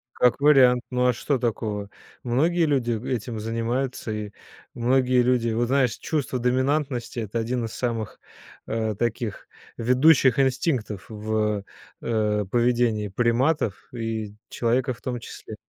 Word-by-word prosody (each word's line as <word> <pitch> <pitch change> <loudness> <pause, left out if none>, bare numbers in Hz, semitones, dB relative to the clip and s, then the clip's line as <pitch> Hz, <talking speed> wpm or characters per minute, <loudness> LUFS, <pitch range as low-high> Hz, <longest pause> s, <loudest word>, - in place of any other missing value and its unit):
Как 125 +1 +3
вариант, 130 -4 +5
ну 125 0 +2
а 125 - +4
что 130 +4 -1
такого? 105 -3 -2 0.3
Многие 160 +8 +2
люди 135 -6 +1 0.2
этим 120 -2 -3
занимаются, 115 +3 -2
и 105 -1 -4 0.4
многие 125 +1 +3
люди 120 -1 +2
вот 115 +2 0
знаешь, 130 -2 +2
чувство 145 -4 -2
доминантности- 130 0 0
это 110 +1 -3
один 120 +1 -1
из 110 - -7
самых, 115 -4 -3 0.5
э, 110 -1 -1
таких 115 -1 -3 0.3
ведущих 130 +2 +4
инстинктов 130 - 0
в, 105 -1 -1 0.4
э, 105 -2 0
поведении 120 -3 +2
приматов 120 - 0
и 110 -3 -4
человека 125 +2 0
в 115 - -17
том 125 -1 -3
числе. 110 -1 -9
120 Hz, 130 wpm, -24 LUFS, 110-130 Hz, 0.5 s, вариант